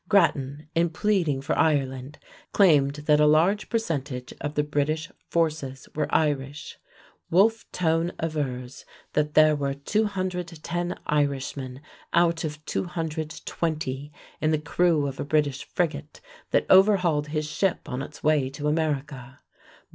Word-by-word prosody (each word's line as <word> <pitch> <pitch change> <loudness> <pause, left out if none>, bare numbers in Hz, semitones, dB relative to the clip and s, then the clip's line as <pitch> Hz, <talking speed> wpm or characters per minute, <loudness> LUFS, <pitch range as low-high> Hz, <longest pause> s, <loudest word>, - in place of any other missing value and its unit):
Grattan, 150 -7 +2
in 170 +1 +2
pleading 165 -6 0
for 140 - -1
Ireland, 135 -3 0 0.4
claimed 145 -8 +4
that 150 -1 +4
a 150 - +5
large 170 +8 +3
percentage 145 - -3
of 145 +1 -4
the 150 - +2
British 155 +3 -1 0.2
forces 150 -6 -1
were 150 -1 -1
Irish. 145 -2 -1 0.5
Wolfe 220 +6 +3
Tone 165 0 +1
avers 135 -5 -3 0.3
that 150 0 0
there 155 0 +6
were 140 -1 -2
210 180 -1 -2
Irishmen 140 -2 -1 0.3
out 170 -1 +3
of 155 -1 -5
220 155 -4 -3 0.3
in 155 - +2
the 155 - +3
crew 155 0 +1
of 135 -1 -5
a - - -1
British 145 -2 0
frigate 170 - -3 0.3
that - - +2
overhauled 185 -6 +4
his 155 0 -2
ship 185 +4 -1
on 125 -2 -3
its 145 +2 -9
way 150 -3 +3
to 145 +2 -4
America. 145 -4 -2
150 Hz, 130 wpm, -26 LUFS, 140-170 Hz, 0.5 s, there